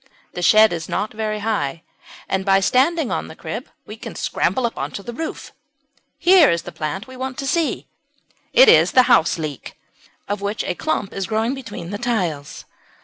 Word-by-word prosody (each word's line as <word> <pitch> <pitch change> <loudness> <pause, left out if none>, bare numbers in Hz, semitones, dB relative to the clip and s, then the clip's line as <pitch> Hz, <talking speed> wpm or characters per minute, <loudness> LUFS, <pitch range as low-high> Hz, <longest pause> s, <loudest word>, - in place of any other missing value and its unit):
The 180 - -5
shed 215 +2 +6
is 165 -1 -5
not 215 - -2
very 215 -1 -3
high, 170 -8 -2 0.4
and 190 0 -1
by 195 0 +4
standing 270 - +2
on - - -2
the - - -11
crib - - -6 0.2
we - - -9
can - - -9
scramble 260 -2 0
on - - -3
to 200 - -6
the 240 - -7
roof. 320 +6 -6 0.7
Here 360 -5 +6
is 170 0 0
the - - -8
plant 155 +7 -4
we 260 0 -12
want 260 0 -5
to 275 - -4
see. 330 +3 0 0.7
It - - +7
is 455 - +6
the 255 - +7
Houseleek, 155 - +1 0.5
of 205 0 -3
which 205 +2 -2
a - - -2
clump 205 - -2
is 195 -1 -3
growing 225 +3 0
between 205 -10 -7
the 205 - -4
tiles. 180 -12 -3
215 Hz, 185 wpm, -21 LUFS, 180-260 Hz, 0.7 s, It